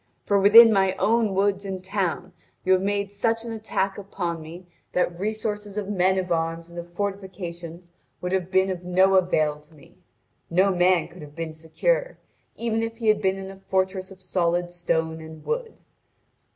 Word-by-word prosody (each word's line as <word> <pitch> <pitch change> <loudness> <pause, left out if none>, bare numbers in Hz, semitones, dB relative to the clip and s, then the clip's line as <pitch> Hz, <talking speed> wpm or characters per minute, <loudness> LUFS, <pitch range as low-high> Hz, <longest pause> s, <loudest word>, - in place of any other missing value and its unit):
For 200 -1 +3
within 225 +3 +9
my 190 -1 +2
own 220 -2 +2
woods 200 0 +1
and 190 -2 -5
town 185 -2 -2 0.3
you 190 - +5
have 185 - +3
made 200 0 -1
such 225 +3 -1
an 230 - -5
attack 205 -3 -2
upon 175 -4 -4
me 170 +4 -10 0.3
that 175 -1 0
resources 210 0 -3
of 205 -1 -3
men 190 -1 +2
of 185 -1 -2
arms 165 0 -1
and 170 - -7
of 170 0 -9
fortifications 180 -3 -6 0.3
would 180 - -4
have 185 -1 -1
been 190 0 +3
of 180 -1 -5
no 185 +2 +3
avail 155 -5 +2
to 150 +1 -22
me; 145 - -19 0.5
no 190 +3 +3
man 175 -2 +3
could 175 0 -14
have 150 -1 -11
been 165 -1 -4
secure, - - -1 0.4
even 225 -1 -1
if 225 0 -4
he 225 -2 +1
had 210 -1 +3
been 190 -1 +1
in 195 0 -7
a - - -11
fortress 190 0 -1
of 190 -1 -13
solid 175 -1 0
stone 160 -2 -1
and 160 -1 -11
wood. 470 -1 -2
190 Hz, 185 wpm, -25 LUFS, 175-200 Hz, 0.5 s, within